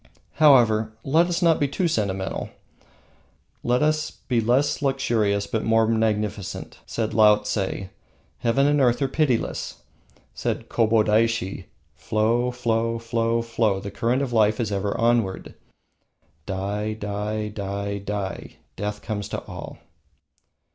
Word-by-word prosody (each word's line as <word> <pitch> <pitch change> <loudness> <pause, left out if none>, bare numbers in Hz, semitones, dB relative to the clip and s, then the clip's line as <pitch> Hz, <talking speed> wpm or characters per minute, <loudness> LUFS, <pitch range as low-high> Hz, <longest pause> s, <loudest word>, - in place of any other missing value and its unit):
However, 115 -7 +5
let 160 +5 +3
us 175 0 -1
not 165 -2 +4
be 145 - +2
too 170 +6 0
sentimental. 100 - -2 1.1
Let 125 +4 +1
us 155 0 +1
be 120 -3 -2
less 130 +7 +1
luxurious 115 -7 +1
but 110 +1 -2
more 115 0 +3
magnificent. 105 -3 -1
Said 110 -2 -2
Laotse: 105 -1 +4 0.8
"Heaven 120 +4 +2
and 145 0 +3
earth 120 -2 +3
are - - +2
pitiless." 130 -4 -1 0.5
Said - - -3
Kobodaishi: 110 -3 +2 0.3
"Flow, 110 - 0
flow, 115 -1 0
flow, 115 0 0
flow, 115 -4 0
the 100 +1 -7
current 120 +7 0
of 125 -3 -4
life 110 -1 +3
is 110 -3 -1
ever 100 0 -1
onward. 115 -5 0 0.9
Die, 100 +3 -2
die, 105 0 -3
die, 100 -1 -4
die, 100 -1 -5 0.2
death 105 0 -4
comes 105 -2 -4
to - - -4
all." - - -8
110 Hz, 125 wpm, -24 LUFS, 105-120 Hz, 1.1 s, However